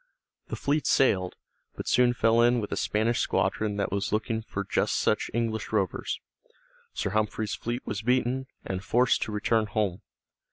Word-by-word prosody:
The - - -4
fleet 145 +2 0
sailed, 95 -9 +3 0.4
but - - -6
soon 125 0 +4
fell 115 0 +4
in 120 +1 +4
with 105 - -4
a - - 0
Spanish 110 +3 +1
squadron 105 -1 0
that 100 - -1
was 100 0 -1
looking 110 +1 -1
for 100 -2 -4
just 100 - 0
such - - +1
English 115 -2 -2
rovers. 100 -5 -1 0.7
Sir 100 - -2
Humphrey's 110 0 -1
fleet 120 +2 -4
was 100 - -3
beaten, 125 +2 +1 0.2
and 95 0 -3
forced 125 +3 +3
to - - -2
return 110 +1 +1
home. 105 -4 -1
110 Hz, 165 wpm, -27 LUFS, 105-120 Hz, 0.7 s, soon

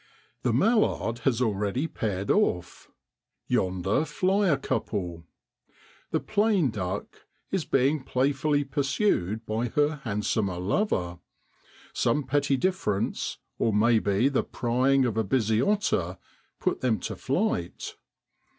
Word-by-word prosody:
The 125 - +1
mallard 130 - +2
has 125 -2 +2
already 105 +5 0
paired 100 - -2
off. 90 - 0 0.6
Yonder 95 - +1
fly 190 +5 +1
a 145 - +3
couple. 90 -10 -3 0.8
The - - 0
plain 205 - +2
duck 95 -2 -5 0.2
is 190 -4 0
being 135 +2 +2
playfully 145 +3 +1
pursued 135 - 0
by 110 +3 -1
her 150 +5 +1
handsomer 105 -5 -1
lover: 90 - -1 0.7
some 150 - +1
petty 140 +1 +1
difference, 125 - -1 0.2
or 115 - +2
maybe 110 0 +3
the 140 -2 +1
prying 130 +3 +1
of 115 -3 -1
a 110 - +2
busy 110 0 +1
otter, 130 - 0 0.4
put - - -1
them 115 -5 +1
to - - -4
flight. 85 0 -2
120 Hz, 115 wpm, -27 LUFS, 100-145 Hz, 0.8 s, a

